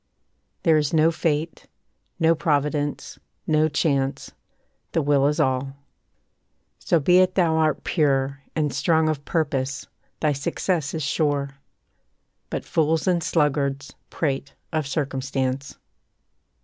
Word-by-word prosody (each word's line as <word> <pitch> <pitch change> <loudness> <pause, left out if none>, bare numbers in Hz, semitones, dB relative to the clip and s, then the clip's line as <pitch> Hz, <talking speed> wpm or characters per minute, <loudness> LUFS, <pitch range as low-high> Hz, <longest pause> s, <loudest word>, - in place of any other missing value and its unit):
There 160 -3 +4
is 150 +2 -1
no 160 +1 +4
Fate, 160 -1 -2 0.5
no 165 0 +4
Providence, 145 -2 -1 0.3
no 155 0 +2
Chance, 140 -2 -1 0.6
The 165 - +2
will 140 -1 +3
is 150 - 0
all. 130 +1 0 1.1
So 170 - +2
be 180 +5 +4
it 185 0 +3
thou 165 -4 +3
art 155 -3 +1
pure, 140 -3 +1
And 150 -4 0
strong 160 +3 +2
of 145 -2 -2
purpose, 140 -4 -1 0.3
thy 150 -1 +2
success 160 +1 -2
is 160 - -3
sure; 145 -1 0 1.0
But - - -4
fools 160 0 +1
and 175 -2 +2
sluggards 140 -3 0 0.2
prate 140 -3 -2 0.2
of 155 -3 -1
circumstance. 135 -2 -2
150 Hz, 120 wpm, -24 LUFS, 140-160 Hz, 1.1 s, There